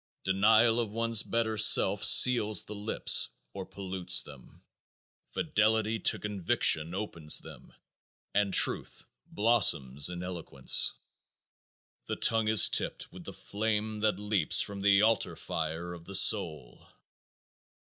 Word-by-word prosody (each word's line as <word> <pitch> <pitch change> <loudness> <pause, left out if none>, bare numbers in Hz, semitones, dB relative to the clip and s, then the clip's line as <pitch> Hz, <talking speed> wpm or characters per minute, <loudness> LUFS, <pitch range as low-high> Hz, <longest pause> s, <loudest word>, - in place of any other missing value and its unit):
Denial 110 +5 +2
of 115 -3 -3
one's 115 0 -1
better 110 -2 -3
self 105 - +4
seals 110 -6 +4
the 105 - -10
lips 105 +1 +1 0.2
or 95 -1 -9
pollutes 95 -2 -2
them. - - -17 0.7
Fidelity 110 +1 -2
to - - 0
conviction 90 -4 -1
opens 85 -7 -1
them - - -10 0.6
and 100 -1 -1
truth - - 0 0.2
blossoms 90 - +1
in 90 0 -8
eloquence. 85 -7 -1 1.1
The - - -4
tongue 115 -1 0
is 110 -1 +5
tipped - - -3
with - - -13
the - - -8
flame 110 0 -5
that 105 -3 -1
leaps 105 -6 +1
from 100 -1 -2
the 100 +1 +2
altar 115 +1 -1
fire 80 +2 -6
of 85 -1 -14
the 100 - -8
soul. 80 - +1
105 Hz, 125 wpm, -28 LUFS, 90-110 Hz, 1.1 s, is